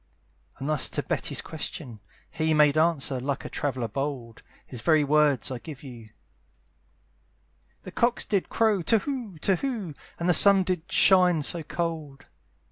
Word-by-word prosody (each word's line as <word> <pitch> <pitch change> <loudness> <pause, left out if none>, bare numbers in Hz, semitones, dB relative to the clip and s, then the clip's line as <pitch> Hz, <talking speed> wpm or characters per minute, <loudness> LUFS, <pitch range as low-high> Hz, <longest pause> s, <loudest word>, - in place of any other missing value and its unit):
And 135 - -6
thus 155 -3 +1
to - - -3
Betty's - - -1
question, 140 -7 -7 0.3
he 155 0 0
Made 150 -1 +4
answer, 155 -5 +1
like 135 +2 -4
a - - -5
traveller 130 -5 -2
bold, 130 -1 -5 0.2
(His 125 -3 -8
very 155 +3 +3
words 145 -3 +2
I 125 - -5
give 145 +1 -10
to 140 - -11
you,) 115 -4 -12 1.7
"The - - -9
cocks 240 0 0
did 200 -4 -1
crow 220 -4 +1
to 225 +7 +3
whoo, 245 - -5
to 195 - +2
whoo, 225 - -4 0.3
"And 170 - -2
the 180 - +4
sun 195 +3 +7
did 180 -1 -4
shine 180 -5 +4
so 170 +3 -1
cold." 155 -4 -5
155 Hz, 160 wpm, -26 LUFS, 135-180 Hz, 1.7 s, sun